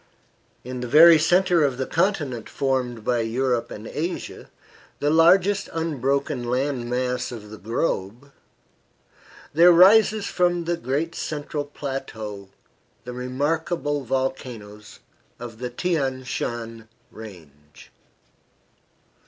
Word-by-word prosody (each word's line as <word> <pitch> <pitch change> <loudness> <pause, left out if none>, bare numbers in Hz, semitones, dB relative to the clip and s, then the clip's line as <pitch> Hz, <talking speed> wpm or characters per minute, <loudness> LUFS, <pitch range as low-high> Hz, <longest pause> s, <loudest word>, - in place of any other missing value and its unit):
In 125 0 -6
the 125 - -4
very 160 +5 +8
centre 175 +1 +3
of 135 -3 0
the 130 - -2
continent 155 - -1
formed 125 -4 -2
by 120 -1 +1
Europe 120 +1 -1
and 105 - -9
Asia, 165 +9 -5 0.5
the 145 +1 +1
largest 185 +5 +4
unbroken 140 -4 -1
land 125 0 -2
mass 125 0 -2
of 105 -3 -9
the 110 - -9
globe, 115 +2 -3 1.2
there 170 +4 +7
rises 200 +4 +6
from 175 -2 +1
the 170 +1 -1
great 150 +4 -2
central 150 -2 -4
plateau 110 -9 -6 0.5
the 125 +2 -7
remarkable 145 +4 -2
volcanoes 120 -5 -5 0.4
of 115 -2 -9
the 125 0 -4
Thian 135 -2 -2
Shan 115 -3 -5 0.2
Range. 80 -9 -14
130 Hz, 110 wpm, -23 LUFS, 120-165 Hz, 1.2 s, very